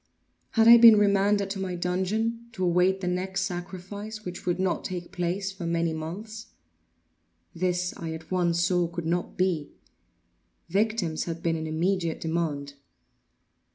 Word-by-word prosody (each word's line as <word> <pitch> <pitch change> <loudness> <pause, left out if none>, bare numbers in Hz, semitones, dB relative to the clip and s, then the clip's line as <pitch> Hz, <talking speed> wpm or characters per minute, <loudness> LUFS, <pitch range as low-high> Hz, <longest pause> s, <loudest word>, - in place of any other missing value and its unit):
Had 225 -1 +4
I 235 0 +11
been 230 -2 +9
remanded 200 -1 +2
to 195 - -4
my 185 -2 -3
dungeon, 215 +7 -1
to 185 - -3
await 180 +2 +2
the 180 - -3
next 190 +2 -1
sacrifice, 190 +4 -6
which 180 0 -7
would 175 0 0
not 185 -1 0
take 180 -1 -5
place 190 +1 -2
for 190 -3 -6
many 170 -1 0
months? 210 +8 -7 1.1
This 180 0 -1
I 165 -1 -5
at 160 +1 -10
once 175 -2 +1
saw 180 -1 +2
could 170 0 -6
not 175 +2 -2
be. 180 -5 0 1.0
Victims 195 -4 0
had 165 -1 -5
been 165 -1 +1
in 160 0 -4
immediate 170 +1 -1
demand. 155 -4 -2
180 Hz, 150 wpm, -27 LUFS, 170-200 Hz, 1.1 s, I